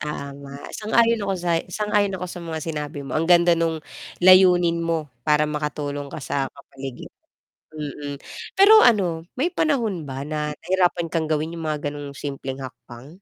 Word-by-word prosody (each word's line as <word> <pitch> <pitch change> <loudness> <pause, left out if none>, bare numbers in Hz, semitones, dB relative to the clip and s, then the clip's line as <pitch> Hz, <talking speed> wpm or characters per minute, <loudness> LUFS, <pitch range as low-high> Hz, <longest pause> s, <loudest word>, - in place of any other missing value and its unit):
Tama, 140 -1 -6 0.2
sang-ayon 230 +1 +2
ako 195 -1 -1
sa 170 -2 0
sang-ayon 205 0 0
ako 180 - -5
sa 175 0 -7
mga 165 -1 -5
sinabi 150 -2 -4
mo 135 - -7
ang 165 +2 0
ganda 175 0 +6
nung 165 -2 0 0.4
layunin 180 -2 +6
mo 165 -5 -2
para 150 +3 +3
makatulong 150 -1 -3
ka - - -8
sa 135 -1 -1
kapaligiran, 135 -2 -9 0.6
mm. 145 -2 -6 0.4
Pero 430 +3 +8
ano 175 -8 +3
may 335 +7 0
panahon 235 - 0
ba 135 +1 -5
na 150 0 -2 0.2
nahirapan 180 -3 +1
kang 160 -2 0
gawin 155 +2 -1
yung 165 -2 -4
mga 150 - -1 0.2
ganong 145 -1 -8
simpleng 135 -2 -5
hakbang? 130 -1 -10
160 Hz, 160 wpm, -23 LUFS, 145-180 Hz, 0.6 s, Pero